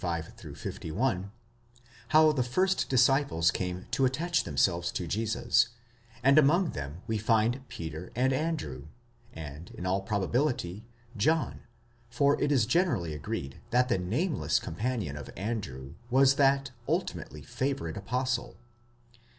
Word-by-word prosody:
35 85 -2 -5
51), 100 +2 -2 0.8
how 155 +2 +6
the 140 -4 0
first 185 +11 +1
disciples 130 - +3
came 90 0 -3
to 135 +1 +1
attach 160 +7 +1
themselves 85 +3 +1
to 90 - -3
Jesus, 115 +5 +2 0.6
and 140 +3 +7
among 165 +5 +4
them 70 +6 -6
we 110 -2 -1
find 115 +4 +2
Peter 80 +2 -7
and 130 +2 +2
Andrew, 130 - -3 0.4
and, 75 +1 -8
in 90 - -6
all 95 +2 +1
probability, 105 - -1 0.3
John, 155 +9 +1 0.5
for 140 +4 +2
it 145 - +2
is 130 -6 +4
generally 125 - +1
agreed 70 -2 -5
that 125 +1 +3
the 115 - +2
nameless 130 - 0
companion 105 - -3
of 75 -2 -8
Andrew 80 - -4 0.2
was 135 +1 +5
that 140 -1 +3 0.2
ultimately 75 +2 -2
favourite 120 - -2
apostle. 125 +3 -2
115 Hz, 125 wpm, -29 LUFS, 85-135 Hz, 0.8 s, and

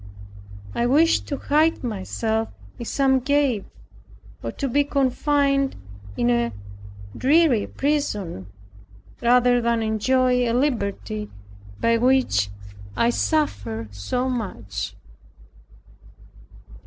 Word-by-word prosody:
I 240 - 0
wished 310 +6 +3
to 285 - -3
hide 310 +3 +2
myself 220 0 -2 0.3
in 235 - -5
some 265 +1 +2
cave, 275 -6 +1 0.8
or - - -4
to 275 - -3
be 285 +3 +2
confined 275 0 +1 0.4
in 120 0 +2
a 120 -1 +1 0.6
dreary 285 -4 +3
prison, 210 - -2 0.7
rather 245 0 +4
than 235 -1 +1
enjoy 250 +3 +2
a - - 0
liberty 215 -5 -1 0.5
by 230 0 +3
which 245 - +2 0.5
I 235 - +3
suffered 115 - -1
so 245 - -2
much. 115 - -4
245 Hz, 95 wpm, -23 LUFS, 210-275 Hz, 0.8 s, rather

